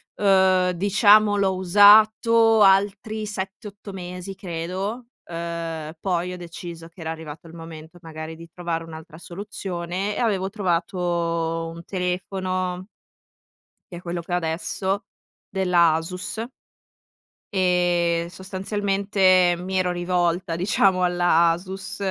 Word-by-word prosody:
uhm, 190 -2 +3
diciamo 205 +3 +4
l'ho 190 -2 +1
usato 215 +4 +6
altri 205 +2 +3
7,8 200 +1 -7
mesi 180 +1 -7
credo, 190 +6 -5 0.2
uhm, 165 -2 -5
poi 180 -1 -1
ho - - -7
deciso 170 -1 -9
che 170 - -15
era 160 0 -3
arrivato 160 0 -9
il 160 - -13
momento 165 +1 -11
magari 160 -1 -8
di 165 +1 -12
trovare 170 -1 -3
un'altra 160 -1 -11
soluzione 185 +1 -5
e - - -4
avevo 195 -5 0
trovato 170 -3 -1
un 170 - -10
telefono 185 0 -3 1.1
che - - -7
è - - -10
quello 175 0 -4
che 170 - -12
ho - - +3
adesso, 190 +4 -2 0.4
della 180 -4 +3
Asus. 180 +7 -4 1.1
E 175 -2 +1
sostanzialmente, 190 -1 +1
mi 185 +2 -5
ero 185 -1 +1
rivolta 175 -1 0
diciamo 185 +1 +2
alla 175 -1 +3
Asus 190 +3 -4
180 Hz, 115 wpm, -23 LUFS, 170-195 Hz, 1.1 s, usato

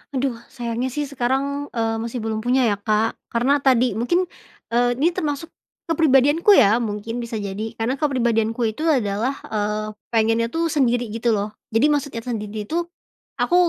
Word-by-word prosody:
Aduh 255 -3 -1
sayangnya 240 0 -3
sih 295 +4 -2
sekarang, 280 +2 -1
eee, 225 -1 0
masih 230 0 -4
belum 220 -1 -2
punya 250 +3 +2
ya, 205 -4 +1
Kak, 215 +2 0
karena 265 +5 +2
tadi 255 -2 +3
mungkin, 295 +11 +1 0.5
eee, 245 +1 +2
ini 305 +7 +2
termasuk, 310 0 -3 0.4
kepribadianku 310 +2 +4
ya 230 - +6
mungkin 215 +1 -4
bisa 230 -2 -4
jadi 205 +2 -4
karena 235 +4 0
kepribadianku 235 -5 +1
itu 300 - -6
adalah, 240 -2 +1 0.2
eee, 210 0 -1 0.2
pengennya 225 0 +2
tuh 330 +1 0
sendiri 245 -6 +1
gitu 225 +2 0
loh 210 +1 -3 0.2
jadi 230 +7 +4
maksudnya 285 -5 -1
sendiri 210 -2 -3
itu, 340 +4 -1 0.5
aku 350 - +2
240 Hz, 160 wpm, -22 LUFS, 220-280 Hz, 0.5 s, ya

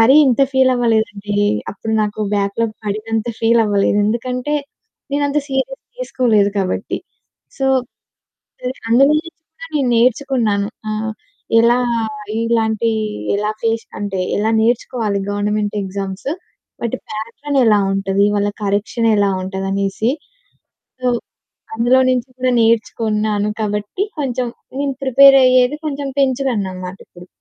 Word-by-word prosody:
మరి 240 +5 +6
ఇంత 255 0 +2
ఫీలవ్వలేదండి. 225 -6 +1 0.4
అప్పుడు 220 +2 -5
నాకు 210 0 -3 0.2
బ్యాక్‌లాగ్ 205 +3 -1
పడినంత 215 +2 -2
ఫీలవ్వలేదు. 215 -3 +3
ఎందుకంటే 250 +5 -1 0.6
నేనంత 285 +1 +1
సీరియస్‌గా 270 - -1 0.2
తీసుకోలేదు 225 - +2
కాబట్టి. 185 -1 -2 0.6
సో, 270 - +1 0.9
సరే 250 0 -3 0.2
అందులో 270 +4 +5
నుంచి 335 +1 -9 0.2
కూడా 330 - -10
నేను 270 -4 +1
నేర్చుకున్నాను. 230 -4 +2 0.2
ఆహ్, 215 +1 -2 0.5
ఎలా 235 +2 +4 0.7
ఇలాంటి 230 -1 +1 0.5
ఎలా 210 +1 -1
ఫేస్ 225 0 0 0.2
అంటే 195 -2 -3 0.2
ఎలా 215 +2 +1
నేర్చుకోవాలి 225 -3 0
గవర్నమెంట్ 205 +1 -1
ఎగ్జామ్సు. 195 +5 -4 0.5
వాటి 235 - -2
ప్యాటర్న్ 230 +6 -3
ఎలా 210 -2 +5
ఉంటది, 195 +1 +1
వాళ్ళ 205 0 +1 0.2
కరెక్షనేలా 205 +1 +1
ఉంటదనేసి. 195 +4 -1 0.9
సో, 255 - -2 0.7
అందులో 240 +3 +4
నుంచి 255 0 0
కూడా 255 0 +1
నేర్చుకున్నాను 215 -2 +1
కాబట్టి 210 - -2 0.2
కొంచెం 255 -3 -1 0.3
నేను 280 -2 -1
ప్రిపేరయ్యేది 265 0 +6
కొంచెం 280 -1 -3
పెంచుకున్ననమాటిప్పుడు. 195 -9 -2
225 Hz, 105 wpm, -18 LUFS, 205-255 Hz, 0.9 s, మరి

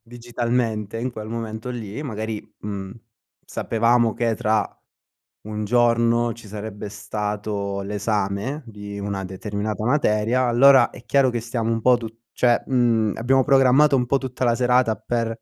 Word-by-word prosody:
digitalmente, 115 -2 -2
in 125 +3 -2
quel 110 -3 -7
momento 115 +1 -5
lì, 115 -1 -6
magari, 110 -4 -4 0.2
mhmm, 100 -2 -5 0.5
sapevamo 115 0 +1
che 115 -2 0
tra 110 -1 +1 0.8
1 105 0 -4
giorno 115 +1 +2
ci 115 -2 -14
sarebbe 105 0 -6
stato 105 -1 -4
l'esame 105 +6 -2
di 105 -2 -8
una 100 -1 -3
determinata 105 +3 -4
materia, 120 -1 +2
allora 130 +3 +6
è 120 - -13
chiaro 135 +1 +3
che 120 -1 -2
stiamo 115 -1 -2
un 115 - -1
po' 125 +2 +5
tu 115 -2 -6 0.3
cioè 120 -1 +2
mhmm, 115 -5 +2
abbiamo 130 +3 +3
programmato 135 +1 +5
un 125 -1 +1
po' 140 - +2
tutta 130 -1 -4
la 120 - +3
serata 125 -2 +2
per, 115 -1 -2
115 Hz, 150 wpm, -22 LUFS, 105-120 Hz, 0.8 s, allora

